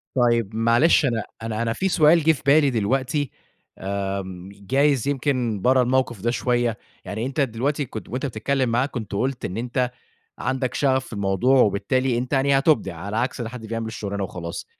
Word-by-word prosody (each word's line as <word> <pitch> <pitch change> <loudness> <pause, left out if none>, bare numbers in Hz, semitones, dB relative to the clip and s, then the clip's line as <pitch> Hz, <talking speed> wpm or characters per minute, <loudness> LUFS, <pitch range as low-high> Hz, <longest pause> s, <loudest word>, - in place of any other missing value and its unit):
طيب 120 -4 +2
معلش، 115 +8 +4
أنا 115 -4 0 0.2
أنا 115 -1 -3
أنا 115 -1 0
في 190 +10 -1
سؤال 165 -1 +5
جِه 160 - +5
في 150 - -4
بالي 145 +1 +5
دلوقتي، 130 +5 0 0.7
آمم، 95 -2 -5
جايِز 135 +6 +1
يمكن 125 -6 0
برا 130 +1 +4
الموقِف 125 -3 0
ده 120 +4 0
شوية؛ 120 -2 0 0.3
يعني 110 +4 -4
أنتَ 135 +3 -2
دلوقتي 140 +4 0
كنت 110 -2 -8
وأنتَ 130 +4 -3
بتتكلَّم 130 +2 -1
معاه، 120 +3 +1
كنت 120 -6 -7
قُلت 125 +5 -2
إن 90 - -4
أنتَ 125 +2 -1 0.5
عندك 130 -2 -1
شغَف 130 -2 +1
في - - -11
الموضوع 100 +6 +2
وبالتالي 120 +5 +1
أنتَ 125 +4 -3
يعني 135 +1 +3
هتُبدِع 135 - +2
على 100 +6 -5
عكس 125 +1 -1
حد 115 0 -6
بيعمَل 115 0 -3
الشغلانة 100 -3 -4
وخلاص. 85 -3 -6
125 Hz, 175 wpm, -23 LUFS, 110-135 Hz, 0.7 s, سؤال